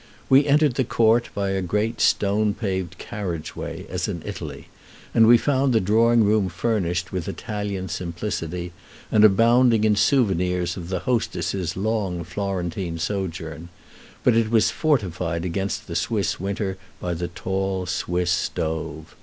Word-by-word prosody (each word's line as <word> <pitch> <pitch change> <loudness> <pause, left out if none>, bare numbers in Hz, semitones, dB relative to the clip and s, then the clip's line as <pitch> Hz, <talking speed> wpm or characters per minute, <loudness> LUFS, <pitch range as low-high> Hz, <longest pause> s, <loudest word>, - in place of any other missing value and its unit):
We 140 +2 +6
entered 145 -1 +4
the 130 - +1
court 115 0 +2
by 100 -1 -1
a 95 0 0
great 105 +5 -1
stone 105 +1 +2
paved 95 -5 -3
carriage 90 -7 -5
way, - - -6
as - - -2
in - - -4
Italy, - - -7 0.5
and 115 -1 +6
we 120 +1 +8
found 135 +1 +1
the 110 - +4
drawing 115 +4 +4
room 105 -2 +2
furnished 90 -2 -1
with 90 -4 -3
Italian 100 -3 -4
simplicity, 85 0 -4 0.4
and 110 - +5
abounding 115 +2 +5
in 105 -1 +4
souvenirs 90 - +2
of 85 -1 -7
the 95 -2 -2
hostess's 95 -6 -1
long 100 -4 -1
Florentine 90 -1 -3
sojourn; 85 -3 -4 0.5
but 120 - +4
it 115 -1 +2
was 115 -1 +3
fortified 90 - 0
against 95 +3 -2
the 85 - -6
Swiss 100 +3 0
winter 95 0 -3 0.2
by 90 - -2
the 85 +1 -3
tall 95 +1 -2
Swiss 90 0 -1
stove. 80 -3 -3
95 Hz, 145 wpm, -23 LUFS, 90-110 Hz, 0.5 s, we